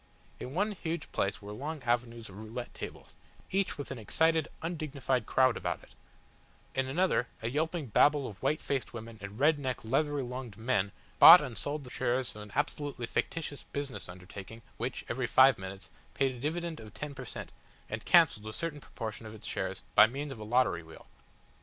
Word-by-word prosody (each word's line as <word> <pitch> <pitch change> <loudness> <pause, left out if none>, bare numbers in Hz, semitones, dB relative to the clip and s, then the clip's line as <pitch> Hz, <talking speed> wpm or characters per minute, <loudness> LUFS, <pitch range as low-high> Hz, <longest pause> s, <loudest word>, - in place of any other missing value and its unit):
In 130 +4 -6
one 205 +4 +2
huge 170 -4 -4
place 100 +1 -1
were 100 - -7
long 145 +6 -5
avenues 120 -1 -1
of 95 - -12
roulette 110 +3 -6
tables, - - -8 0.4
each 195 -2 +1
with 145 - -6
an 130 - -5
excited, 160 +8 +2 0.2
undignified 140 -7 -1
crowd 130 -2 +4
about - - -3
it; - - -18 0.8
in 135 0 0
another 150 -3 +2 0.2
a 115 - 0
yelping 160 +2 -1
Babel 145 +5 +4
of 95 -5 -10
white 155 - +1
faced 135 -2 -2
women 115 -1 -8
and 100 +2 -8
red 150 +1 +4
necked 130 -4 -3
leathery 145 +3 +1
lunged 125 -4 -6
men 110 -4 +1 0.3
bought 175 +2 +13
and 130 -7 -5
sold 145 +4 -1
the 125 - -11
shares 125 -1 0
of 105 - -8
an 105 0 -10
absolutely 145 -3 -1
fictitious 145 +4 -2
business 140 -8 -4
undertaking 95 +5 -10
which, 125 +2 -3
every 120 +1 -1
five 130 0 +6
minutes, 95 -3 -8 0.2
paid 135 -1 +2
a 125 - -9
dividend 165 +4 -2
of 110 -1 -11
ten 150 -1 -5
per - - -7
cent, - - -7 0.4
and - - -5
cancelled 105 +1 +5
a 110 - -5
certain 150 +2 -4
proportion 110 -2 -6
of 110 - -9
its 105 - -11
shares - - -3
by 105 - +9
means 140 +4 -5
of 130 - -7
a - - -6
lottery 110 -6 +2
wheel. 80 -1 -13
130 Hz, 190 wpm, -31 LUFS, 110-145 Hz, 0.8 s, bought